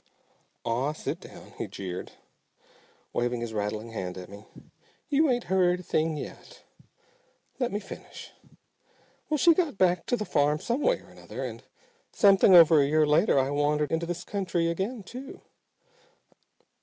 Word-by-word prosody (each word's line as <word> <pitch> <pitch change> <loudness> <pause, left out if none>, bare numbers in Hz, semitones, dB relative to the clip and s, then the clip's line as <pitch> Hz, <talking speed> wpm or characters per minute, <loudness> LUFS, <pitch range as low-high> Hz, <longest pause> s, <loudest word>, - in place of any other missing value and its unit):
"Aw, 125 +6 0
sit - - -5
down!" - - -13
he - - -3
jeered, 90 -2 -7 1.0
waving 120 0 -1
his 115 -1 -5
rattling 105 +2 -3
hand 95 -4 -5
at 90 -1 -9
me. 100 +2 -12 0.6
"You 300 +1 +3
ain't 245 -2 +1
heard 180 -1 +2
a - - -9
thing 160 -2 0
yet. - - -10 1.0
Let 245 -2 0
me 205 - -2
finish. 210 - -11 1.0
Well, 305 - +1
she 335 +3 +6
got 325 - -1
back 180 -2 +2
to 245 - +1
the 210 - -3
farm 150 -2 +1
some 240 - -2
way - - +2
or - - -18
another, - - -8
and - - -7 0.5
something 195 -3 +6
over 165 -3 +8
a 140 - +2
year 155 +1 +3
later 150 +4 +3
I 135 +1 +2
wandered 145 +1 0
into 165 +1 -1
this 175 +1 -4
country 180 -4 -1
again 200 +6 -3
too. 255 +7 -10
170 Hz, 155 wpm, -27 LUFS, 140-205 Hz, 1.0 s, over